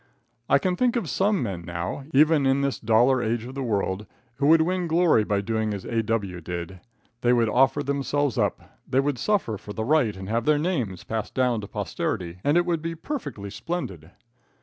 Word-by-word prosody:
I - - +6
can 180 +5 0
think 250 +4 +1
of 235 - -1
some 200 -5 +1
men 95 -6 -4
now, 85 +9 -5
even 150 0 +4
in 135 +1 +3
this 140 -3 -1
$ 120 +3 +3
age 115 +1 -1
of 130 - -8
the 140 - -4
world, 105 -4 -1 0.3
who 140 +1 +2
could 160 0 +6
win 180 +1 -1
glory 165 -8 +4
by 100 -1 0
doing 110 0 -1
as 100 - -8
A.W. 110 -5 -1
did. 85 +2 -6 0.4
They 120 - +3
could 120 -2 +3
offer 135 +5 +3
themselves 140 -1 0
up. - - 0 0.3
They 130 - +2
could 140 -2 0
suffer 190 - 0
for 105 - -8
the 110 +2 -3
right 125 -8 +2
and 95 0 -7
have 115 +2 -1
their 150 -1 +4
names 130 - -2
passed 110 -2 -4
down 125 -4 +1
to 100 - -7
posterity, 85 -2 -3
and 145 +4 +3
it 175 - +3
would 170 -3 0
be 165 +1 -4
perfectly 145 - -5
splendid. 95 - -5
125 Hz, 200 wpm, -25 LUFS, 105-150 Hz, 0.4 s, I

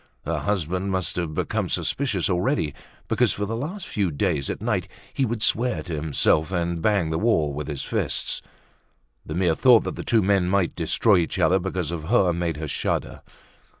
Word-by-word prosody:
Her 85 -1 -1
husband 90 +2 -1
must 95 -2 -2
have 85 -3 -2
become - - -1
suspicious 120 -11 0
already 90 - 0 0.3
because - - +2
for 105 - -2
the 110 +3 -3
last 165 - -5
few 100 -4 0
days, 75 -2 -1
at - - -3
night, - - -1 0.3
he 135 - +1
would 110 -1 -2
swear 125 +2 +1
to 85 - -6
himself 75 +2 +1
and 85 -2 -1
bang 100 -5 +1
the 80 - 0
wall 80 -10 +2
with 75 +1 -5
his 75 -3 -3
fists. - - -1 0.8
The 75 - -6
mere 90 -2 +2
thought 120 +6 +5
that - - -4
the - - -6
two 115 -3 +2
men 95 -2 +2
might 95 -2 +1
destroy 95 +5 +3
each 85 - -2
other 95 +1 +3
because 90 -3 -3
of 80 -2 -5
her 95 -3 +3
made 85 -2 -2
her 80 0 -4
shudder. - - -2
90 Hz, 190 wpm, -24 LUFS, 80-105 Hz, 0.8 s, thought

